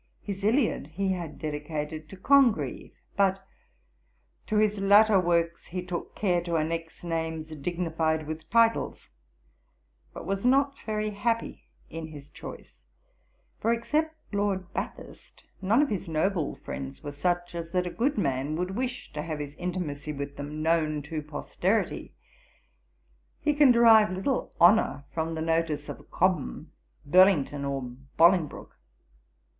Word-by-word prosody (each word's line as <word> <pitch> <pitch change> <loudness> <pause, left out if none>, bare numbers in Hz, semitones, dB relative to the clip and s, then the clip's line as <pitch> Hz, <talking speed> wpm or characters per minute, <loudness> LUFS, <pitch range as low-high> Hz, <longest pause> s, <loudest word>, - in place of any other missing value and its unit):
His 195 -1 -5
Iliad 225 - +2
he 190 +5 -1
had 170 -5 -4
dedicated 155 0 -4
to 195 - -10
Congreve, 255 +2 +3 0.2
but 195 -1 +2 1.0
'to 215 - -1
his 210 -1 +2
latter 205 +1 +6
works 170 -1 0
he 180 +1 -5
took 175 -1 -5
care 180 -4 +1
to 170 -1 -1
annex 165 +2 -3
names 160 -2 -3
dignified 160 0 -1
with 155 +1 -7
titles, 230 0 +2 1.0
but - - -9
was 195 0 -2
not 275 +2 +3
very 215 0 -1
happy 230 +3 -2 0.2
in 160 0 -6
his 145 -2 -11
choice; - - -11 0.8
for, 230 - +1
except 305 +7 0 0.2
Lord 195 -2 -1
Bathurst, - - -7 0.2
none 220 +9 +4
of 295 - -1
his 200 -3 -3
noble 165 0 0
friends 135 +2 -7
were 145 - -5
such 175 +4 -1
as 170 -1 -5
that 180 +1 0
a 175 - -3
good 275 +4 0
man 140 -4 0
would 180 +3 -2
wish 250 -5 -4
to 150 - -3
have 155 0 -4
his 145 -1 -6
intimacy 155 -4 -4
with 140 -1 -5
them 150 +2 -5
known 155 -2 +1
to 155 +1 -4
posterity; 175 +7 -2 1.2
he 300 - +1
can 290 -3 +6
derive 225 -3 +7
little 195 +8 -1
honour 175 -4 +5
from 165 0 -2
the 160 - -3
notice 160 -2 0
of - - -9
Cobham, 180 - 0 0.3
Burlington, 155 -4 +4
or 140 -1 -2 0.3
Bolingbroke.' 170 -1 +3
175 Hz, 140 wpm, -28 LUFS, 155-205 Hz, 1.2 s, derive